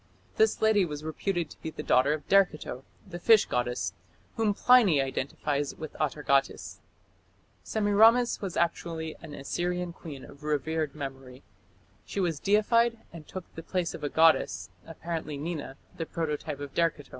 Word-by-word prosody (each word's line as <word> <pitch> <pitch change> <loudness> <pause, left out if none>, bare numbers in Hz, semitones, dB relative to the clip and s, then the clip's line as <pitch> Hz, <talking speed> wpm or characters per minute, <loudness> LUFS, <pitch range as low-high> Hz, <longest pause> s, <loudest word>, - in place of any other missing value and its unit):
This 440 - +3
lady 215 -2 +5
was 150 -3 -5
reputed 170 +1 -2
to - - -14
be 160 - -4
the - - -7
daughter 130 +3 +4
of 155 -2 -6
Derceto, 180 -9 +2 0.2
the 175 -3 -8
fish 220 +3 +6
goddess, 120 -7 -1 0.4
whom 215 -3 +1
Pliny 225 - +5
identified 140 +2 -1
with 155 -2 -7
Atargatis. 140 -2 0 0.8
Semiramis 220 +3 +4
was 190 -4 -4
actually 165 -1 -1
an 155 -3 -9
Assyrian 175 +4 -2
queen 145 -6 -9
of 140 - -15
revered 150 0 -1
memory. 135 -2 -8 0.6
She - - -5
was 170 -6 0
deified 230 +3 +3 0.2
and 160 -3 -10
took 185 -2 -7
the 165 - -7
place 175 0 -2
of - - -8
a 145 - -1
goddess, 160 - +3 0.2
apparently 165 -2 -5
Nina, 145 -3 -5 0.2
the 165 - -4
prototype 150 -2 -3
of 140 -1 -7
Derceto. 165 -4 0
160 Hz, 150 wpm, -28 LUFS, 145-185 Hz, 0.8 s, fish